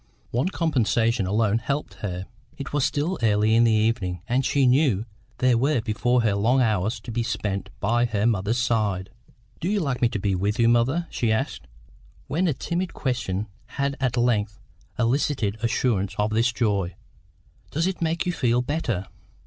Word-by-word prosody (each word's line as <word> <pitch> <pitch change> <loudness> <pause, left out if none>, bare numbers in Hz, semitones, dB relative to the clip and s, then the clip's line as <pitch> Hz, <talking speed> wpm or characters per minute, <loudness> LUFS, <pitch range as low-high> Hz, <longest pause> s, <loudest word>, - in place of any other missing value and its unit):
One 125 +10 +1
compensation 115 - +1
alone 110 +2 +2
helped 140 +5 -3
her; 90 -2 -4 0.3
it 140 -1 -7
was 145 -2 +2
still 155 +8 0
early 110 -1 +3
in 115 +1 +5
the 115 - +4
evening, 105 -5 0
and 125 +3 +1
she 140 +1 +2
knew 125 -5 +3 0.3
there 125 -2 +3
were 140 +1 +2
before 120 +2 +1
her 110 -3 +2
long 115 +7 +2
hours 110 -2 +1
to 120 - -7
be 120 +1 -1
spent 100 -4 -2
by 120 +1 +2
her 110 -3 0
mother's 110 0 +1
side. 105 -6 0 0.5
"Do 175 - -2
you 210 0 +1
like 135 -7 -2
me 120 - +4
to 115 - -3
be 100 0 0
with 100 +4 0
you, 115 -2 +4
mother?" 120 +9 +2
she 115 -2 0
asked, 110 - -2 0.6
when 170 +7 0
a 160 - +2
timid 175 +5 -3
question 110 -7 -2 0.3
had 140 0 0
at 130 -2 0
length 110 -4 +1 0.4
elicited 115 -3 0
assurance 115 -4 0
of 105 +1 +1
this 115 +3 +2
joy. 100 -7 0 0.7
"Does 160 +3 0
it 190 -1 -2
make 165 0 0
you 180 - 0
feel 120 -5 +1
better?" 125 - -2
115 Hz, 175 wpm, -24 LUFS, 105-135 Hz, 0.7 s, in